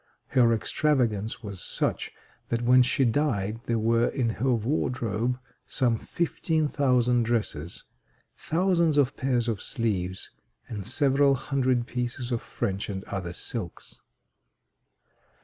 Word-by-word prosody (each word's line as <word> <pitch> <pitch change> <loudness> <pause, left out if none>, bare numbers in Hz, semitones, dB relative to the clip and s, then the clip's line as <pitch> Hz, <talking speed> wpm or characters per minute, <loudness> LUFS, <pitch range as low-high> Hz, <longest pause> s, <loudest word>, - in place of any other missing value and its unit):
Her 120 -3 +4
extravagance 115 -2 0
was 100 -4 -6
such - - -1 0.4
that 120 0 -1
when 125 +1 +6
she 130 +1 +3
died 115 -5 0
there 115 - +1
were 115 +2 +2
in 125 -4 0
her 120 +4 -1
wardrobe 120 -1 0 0.3
some 120 -3 +3
fifteen 160 +3 -1
thousand 125 -4 +2
dresses, 105 -9 -1 0.5
thousands 170 -2 +1
of 140 -3 +3
pairs 125 -3 0
of 110 -4 -1
sleeves, 95 -8 -1 0.4
and 100 -3 -5
several 140 +1 +3
hundred 130 -2 0
pieces 120 +1 -3
of 120 - 0
French 100 +1 -3
and 95 -1 -4
other 95 -4 -4
silks. 90 0 -5
120 Hz, 120 wpm, -27 LUFS, 110-135 Hz, 0.5 s, when